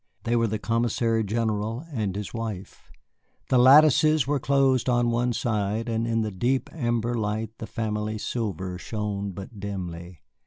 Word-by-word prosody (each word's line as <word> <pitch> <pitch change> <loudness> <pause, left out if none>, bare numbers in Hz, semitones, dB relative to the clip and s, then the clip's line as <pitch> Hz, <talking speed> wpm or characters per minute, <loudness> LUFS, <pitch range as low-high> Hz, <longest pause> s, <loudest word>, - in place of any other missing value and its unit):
They 120 - 0
were 115 -1 +2
the 110 +1 -2
Commissary 115 0 0
general 110 +4 -2
and 105 -6 -2
his 105 -1 -5
wife. 110 -5 -6 0.6
The 130 - +4
lattices 150 +3 +6
were 145 +1 0
closed 135 -2 +2
on 120 -1 +2
one 120 +1 +1
side, 110 -1 -1
and 115 0 -1
in 115 -1 +1
the 110 -1 -2
deep 125 +8 -1
amber 120 -5 -1
light 110 -1 -2
the 110 - -6
family 110 -1 -3
silver 95 -5 -3
shone 105 -1 -3
but 95 +3 -9
dimly. 90 -4 -6
115 Hz, 155 wpm, -26 LUFS, 105-120 Hz, 0.6 s, lattices